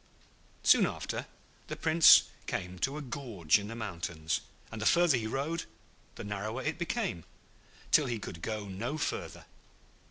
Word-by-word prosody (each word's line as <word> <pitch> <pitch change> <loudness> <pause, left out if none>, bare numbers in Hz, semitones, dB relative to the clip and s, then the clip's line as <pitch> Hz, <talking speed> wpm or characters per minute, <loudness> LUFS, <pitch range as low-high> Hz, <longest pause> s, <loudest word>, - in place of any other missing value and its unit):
Soon - - +6
after, - - -4 0.4
the - - -4
Prince 160 0 +7 0.2
came 90 0 -4
to 135 +7 -1
a 150 - -5
gorge 115 - 0
in 100 - -7
the 115 - -6
mountains, 85 -7 -3 0.3
and 110 -1 -6
the 110 - +2
further 175 -4 +5
he 110 -3 -2
rode 145 +8 -2 0.5
the - - -7
narrower 105 +2 -4
it 155 +2 -2
became, 175 - -2 0.7
till 150 - +5
he 120 -2 -2
could 85 -5 -8
go 110 0 -4
no 115 +10 -4
further. 150 - -4
115 Hz, 155 wpm, -31 LUFS, 100-150 Hz, 0.7 s, Prince